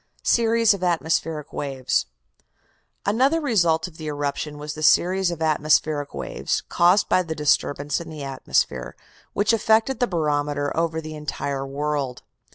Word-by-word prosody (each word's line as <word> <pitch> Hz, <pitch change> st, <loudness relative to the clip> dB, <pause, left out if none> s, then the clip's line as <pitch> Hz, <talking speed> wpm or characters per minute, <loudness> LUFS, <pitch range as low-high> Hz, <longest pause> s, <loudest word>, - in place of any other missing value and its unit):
SERIES 230 Hz, -1 st, +3 dB
OF 200 Hz, -, -6 dB
ATMOSPHERIC 160 Hz, -3 st, -1 dB
WAVES 135 Hz, -3 st, -1 dB, 1.0 s
Another 260 Hz, +10 st, +2 dB
result 175 Hz, -, +2 dB
of 165 Hz, -3 st, -15 dB
the 155 Hz, -, -7 dB
eruption 145 Hz, 0 st, -3 dB
was 150 Hz, 0 st, -6 dB
the 155 Hz, -, -8 dB
series 185 Hz, +4 st, +3 dB
of 165 Hz, -2 st, -4 dB
atmospheric 155 Hz, -1 st, +1 dB
waves, -, -, -2 dB
caused 180 Hz, +4 st, +4 dB
by 185 Hz, -, +3 dB
the 165 Hz, -3 st, -5 dB
disturbance 145 Hz, 0 st, 0 dB
in 170 Hz, -, -9 dB
the 155 Hz, -2 st, -7 dB
atmosphere, 130 Hz, -, -1 dB, 0.4 s
which 205 Hz, +3 st, +2 dB
affected 225 Hz, +3 st, +2 dB
the 245 Hz, -, +2 dB
barometer 145 Hz, -4 st, -1 dB
over 165 Hz, -1 st, 0 dB
the 155 Hz, 0 st, -8 dB
entire 140 Hz, -2 st, -4 dB
world. 140 Hz, -2 st, -3 dB
155 Hz, 145 wpm, -23 LUFS, 145-185 Hz, 1.0 s, caused